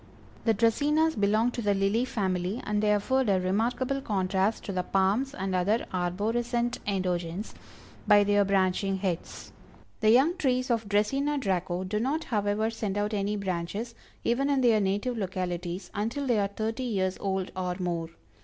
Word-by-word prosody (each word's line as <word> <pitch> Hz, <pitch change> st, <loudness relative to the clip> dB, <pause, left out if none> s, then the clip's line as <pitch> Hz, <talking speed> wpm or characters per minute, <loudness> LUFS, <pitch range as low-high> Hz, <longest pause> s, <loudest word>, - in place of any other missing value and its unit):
The 225 Hz, -2 st, +3 dB
Dracænas 295 Hz, +9 st, +2 dB
belong 215 Hz, +3 st, +2 dB
to 240 Hz, -, -3 dB
the 205 Hz, -2 st, +2 dB
Lily 200 Hz, +5 st, +1 dB
family, 190 Hz, -2 st, -1 dB
and 210 Hz, 0 st, 0 dB
they 210 Hz, -1 st, +3 dB
afford 250 Hz, +4 st, +1 dB
a 190 Hz, -2 st, +3 dB
remarkable 240 Hz, +8 st, 0 dB
contrast 195 Hz, -1 st, 0 dB
to -, -, -4 dB
the 185 Hz, -1 st, 0 dB
palms 195 Hz, +9 st, +1 dB
and 190 Hz, 0 st, -3 dB
other 200 Hz, +5 st, +1 dB
arborescent 235 Hz, +7 st, -1 dB
endogens, 185 Hz, 0 st, -2 dB, 0.5 s
by 205 Hz, 0 st, +7 dB
their 205 Hz, 0 st, +3 dB
branching 195 Hz, 0 st, +1 dB
heads. 185 Hz, -3 st, -4 dB, 0.5 s
The 215 Hz, -, +3 dB
young 275 Hz, +10 st, +5 dB
trees 255 Hz, -5 st, +1 dB
of 225 Hz, -3 st, -1 dB
Dracæna 275 Hz, +8 st, +1 dB
Draco 185 Hz, -5 st, -1 dB
do 205 Hz, +3 st, -2 dB
not, 285 Hz, +7 st, 0 dB
however, 210 Hz, 0 st, 0 dB
send 210 Hz, -3 st, -3 dB
out 210 Hz, +1 st, -1 dB
any 205 Hz, 0 st, 0 dB
branches, 200 Hz, +4 st, -3 dB, 0.3 s
even 270 Hz, +4 st, +1 dB
in 275 Hz, -2 st, +2 dB
their 230 Hz, -4 st, +4 dB
native 205 Hz, +5 st, -1 dB
localities, 180 Hz, -1 st, -4 dB
until 230 Hz, +7 st, -2 dB
they 240 Hz, -5 st, +2 dB
are 200 Hz, -, +2 dB
thirty 220 Hz, +4 st, -3 dB
years 190 Hz, -7 st, -1 dB
old 190 Hz, -1 st, -2 dB
or 180 Hz, -1 st, -2 dB
more. 170 Hz, -2 st, -2 dB
205 Hz, 165 wpm, -28 LUFS, 190-235 Hz, 0.5 s, by